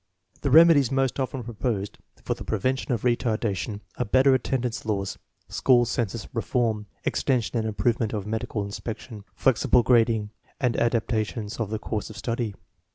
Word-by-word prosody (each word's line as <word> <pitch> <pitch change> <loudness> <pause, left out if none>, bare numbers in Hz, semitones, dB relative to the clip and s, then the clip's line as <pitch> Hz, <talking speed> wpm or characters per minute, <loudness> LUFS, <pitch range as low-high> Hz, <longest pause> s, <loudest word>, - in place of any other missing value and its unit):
The 140 - 0
remedies 155 -3 +7
most 135 0 +1
often 130 -1 -2
proposed 110 -3 -3 0.2
for - - 0
the - - -9
prevention 130 +5 -1
of 120 -4 -1
retardation 110 -4 0 0.2
are 125 - +1
better 130 +5 +4
attendance 125 -2 -1
laws, 100 -3 -2 0.3
school 120 -2 +3
census 115 -2 -2
reform, 115 -3 0 0.2
extension 125 -3 0
and 110 - -1
improvement 110 +1 0
of 105 -3 -3
medical 110 -1 -2
inspection, 105 +1 -7
flexible 125 -1 +3
grading, 115 -3 +3 0.3
and 125 -3 +1
adaptations 115 -2 -1
of 110 -3 -1
the 110 - -2
course 110 0 -4
of 110 - -10
study. 115 -1 -2
115 Hz, 150 wpm, -26 LUFS, 110-125 Hz, 0.3 s, remedies